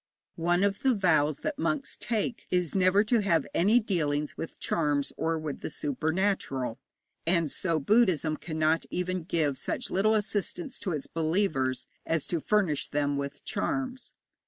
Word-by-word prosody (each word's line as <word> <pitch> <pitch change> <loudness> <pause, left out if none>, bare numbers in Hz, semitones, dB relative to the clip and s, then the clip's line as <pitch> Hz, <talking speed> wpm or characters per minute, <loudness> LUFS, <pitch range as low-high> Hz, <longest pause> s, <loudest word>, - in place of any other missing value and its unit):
One 175 +2 +3
of 200 -1 +1
the 260 -2 +3
vows 155 -7 +2
that 300 -2 -3
monks 285 -2 -1
take 225 0 -2
is 180 -3 0
never 190 +1 +4
to 230 +2 +2
have 170 -7 +2
any 210 +7 +4
dealings 150 -9 -1
with 165 - -7
charms 145 -4 0
or 165 0 0
with 155 -3 -4
the - - -5
supernatural, 150 - -1 0.5
and 170 -4 +2
so 165 -3 +1
Buddhism 175 -3 +3
cannot 155 0 0
even 180 0 -2
give 155 -5 0
such 245 - -3
little 215 +4 +3
assistance 215 - -2
to 190 - -3
its 150 -4 -3
believers 160 -6 0 0.2
as 165 -2 0
to 170 - -1
furnish 185 -5 +1
them 145 -1 0
with 140 0 -5
charms. 260 -2 -2
170 Hz, 155 wpm, -29 LUFS, 150-205 Hz, 0.5 s, never